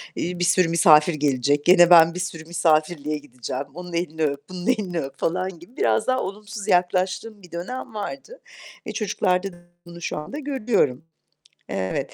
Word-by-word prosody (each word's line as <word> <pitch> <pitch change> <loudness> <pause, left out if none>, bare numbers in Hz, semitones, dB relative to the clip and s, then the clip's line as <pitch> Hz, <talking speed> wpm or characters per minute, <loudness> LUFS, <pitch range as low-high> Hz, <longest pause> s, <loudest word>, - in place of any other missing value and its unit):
iii, 180 +1 -3
bir - - 0
sürü 180 -1 +3
misafir 165 -1 +5
gelecek, 145 0 +1
gene 175 -1 +7
ben 165 -1 +7
bir - - -4
sürü 165 -3 -5
misafirliğe 155 -2 +1
gideceğim, 130 -1 -6
onun 180 0 -9
elini 160 -2 -2
öp, 140 +2 -2
bunun 180 +1 -7
elini 195 -9 0
öp." 135 -1 -6
falan 185 0 -2
gibi 180 +9 -17
biraz 110 - +1
daha 255 0 +2
olumsuz 205 +1 -7
yaklaştığım 185 +4 0
bir 180 - -16
dönem 185 +8 -6
vardı. 275 - -7 0.5
E, - - -5
çocuklarda 190 -3 -1
da - - -15 0.3
bunu 170 0 -11
şu - - -3
anda 255 - -6
görüyorum. 220 - 0 0.6
Evet. 95 -1 -3
175 Hz, 170 wpm, -23 LUFS, 155-190 Hz, 0.6 s, gene